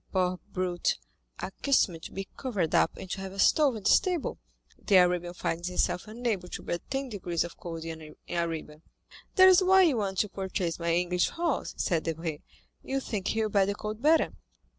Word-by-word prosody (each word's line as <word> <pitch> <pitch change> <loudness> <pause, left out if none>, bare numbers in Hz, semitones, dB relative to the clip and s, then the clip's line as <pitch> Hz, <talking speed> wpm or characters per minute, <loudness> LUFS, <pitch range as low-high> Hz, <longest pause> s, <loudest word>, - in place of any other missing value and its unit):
Poor 185 -1 +1
brute—accustomed 175 - -1
to - - -9
be 195 0 -5
covered 205 - -2
up - - +3
and - - -8
to 195 - -3
have 190 -1 -6
a - - -10
stove 280 +5 +4
in 215 - -7
the - - +3
stable, 360 -5 +2 0.5
the 200 - +5
Arabian 180 -1 +3
finds 170 0 -2
himself 180 +1 0
unable 215 -5 -2
to - - -7
bear 175 - -2
ten 270 0 -2
degrees 180 -7 -2
of 175 - -8
cold 165 -2 -7
in 160 -2 -8
Arabia." 165 -3 -3 0.5
"That's 375 0 +8
why 380 +1 +6
you 305 -8 +3
want 195 -3 -2
to 210 - -3
purchase 185 -3 -3
my 170 0 0
English 180 +1 +1
horse," 335 -4 -2
said 165 -3 +1
Debray, 165 -2 -3 0.4
"you 270 0 -2
think 210 -7 -4
he 220 0 +1
will 215 - 0
bear 200 -2 +3
the 200 - -1
cold 215 +1 -5
better." 315 +3 +4
190 Hz, 185 wpm, -29 LUFS, 170-225 Hz, 0.5 s, That's